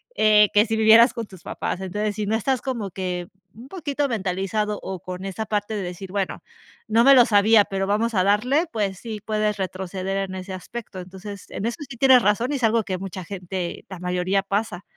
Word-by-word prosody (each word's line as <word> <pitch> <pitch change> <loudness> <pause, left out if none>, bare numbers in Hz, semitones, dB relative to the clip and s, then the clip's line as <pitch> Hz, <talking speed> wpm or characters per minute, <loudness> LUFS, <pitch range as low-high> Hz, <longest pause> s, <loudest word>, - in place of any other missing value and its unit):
eh, 210 -1 +5
que 210 +2 +4
si 225 - 0
vivieras 225 +3 +7
con 230 -2 -5
tus 190 -4 -15
papás, 185 - -4
entonces, 205 +3 -2
si 210 -1 -3
no 220 - +1
estás 255 +3 0
como 235 -8 -4
que 180 -2 -4 0.3
un 240 +4 -12
poquito 290 -4 -2
mentalizado 205 0 -2
o 190 -2 -5
con 185 +2 -7
esa 195 +3 -4
parte 210 +1 -2
de 205 - -2
decir: 180 +1 -7
"Bueno, 195 -2 -3 0.4
no 225 +2 +4
me 275 +1 +8
lo 245 - +7
sabía, 210 0 +5
pero 195 0 -2
vamos 225 +3 0
a 185 -2 +2
darle", 250 - +2
pues 200 -5 -2
sí, 220 -3 -6
puedes 215 -1 0
retroceder 190 0 -3
en 190 - -6
ese 185 +1 -6
aspecto, 195 +1 -8
entonces, 190 +2 -9
en 205 - -5
eso 235 - -2
es 295 - -7
que 245 -3 -10
tienes 260 -1 +6
razón 220 +6 +1
y 285 - 0
es 250 - -7
algo 225 0 +3
que 185 -2 -4
mucha 190 -1 -6
gente, 180 -1 -5
la 190 - -7
mayoría 180 +2 0
pasa. 200 -2 -2
205 Hz, 215 wpm, -23 LUFS, 190-225 Hz, 0.4 s, me